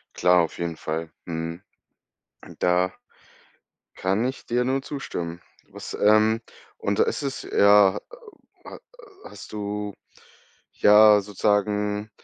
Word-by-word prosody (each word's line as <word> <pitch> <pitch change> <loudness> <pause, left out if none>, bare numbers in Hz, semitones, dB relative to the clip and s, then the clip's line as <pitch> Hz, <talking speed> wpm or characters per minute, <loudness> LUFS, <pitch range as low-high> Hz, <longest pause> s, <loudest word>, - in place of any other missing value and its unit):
Klar, 90 0 +4
auf 80 - -5
jeden 85 -1 -3
Fall. 80 +1 -5 0.2
Mhm. 85 +1 -5 0.8
Hm, - - -14
da 90 +1 +1 1.0
kann 95 +5 0
ich 130 +1 -5
dir 120 +1 0
nur 135 +1 0
zustimmen. 85 - -6 0.3
Was, - - -9
ähm 110 +2 +3 0.4
und 100 0 -2
ist - - +1
es 135 -1 -4
ja 100 -1 +4
äh, - - -4 0.7
ha - - -10 0.5
hast - - -11
du 105 0 -4 0.8
ja 105 0 +6
sozusagen 105 +1 -1
105 Hz, 120 wpm, -24 LUFS, 90-105 Hz, 1.0 s, ja